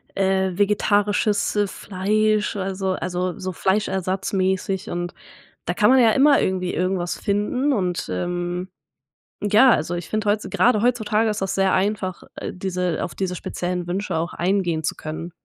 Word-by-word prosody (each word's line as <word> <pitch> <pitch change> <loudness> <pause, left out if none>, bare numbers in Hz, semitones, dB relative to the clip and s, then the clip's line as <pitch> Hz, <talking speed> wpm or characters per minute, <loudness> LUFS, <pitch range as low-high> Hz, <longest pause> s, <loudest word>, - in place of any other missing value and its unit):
äh, 190 -1 +1
vegetarisches, 205 +1 +2
äh, 205 -1 +2
Fleisch, 210 +3 0
also 190 -1 -2
also 180 +1 -3
so 185 -1 -3
fleischersatzmäßig 190 +1 -1
und 175 0 -3 0.5
da 175 - 0
kann 210 - +4
man 265 - +6
ja 230 -2 +6
immer 280 +2 +5
irgendwie 185 -1 -1
irgendwas 180 -1 -1
finden 230 +8 0
und, 180 -6 -1
ähm, 175 - -3 0.7
ja, 210 +5 +5
also 165 -1 +1
ich 175 -1 -6
finde 215 -1 -1
heut 210 +1 +2
z - - -8
grade 235 -4 +3
heutzutage 225 -2 +1
ist 210 -1 -2
das 195 - -1
sehr 195 -1 +2
einfach, 190 -2 -1
äh, - - -4
diese 180 -2 -2
auf - - -5
diese 185 -2 -2
speziellen 180 0 -4
Wünsche 190 +2 -2
auch 165 +2 -2
eingehen 175 -3 0
zu - - -1
können. 160 +3 -6
190 Hz, 160 wpm, -22 LUFS, 180-210 Hz, 0.7 s, man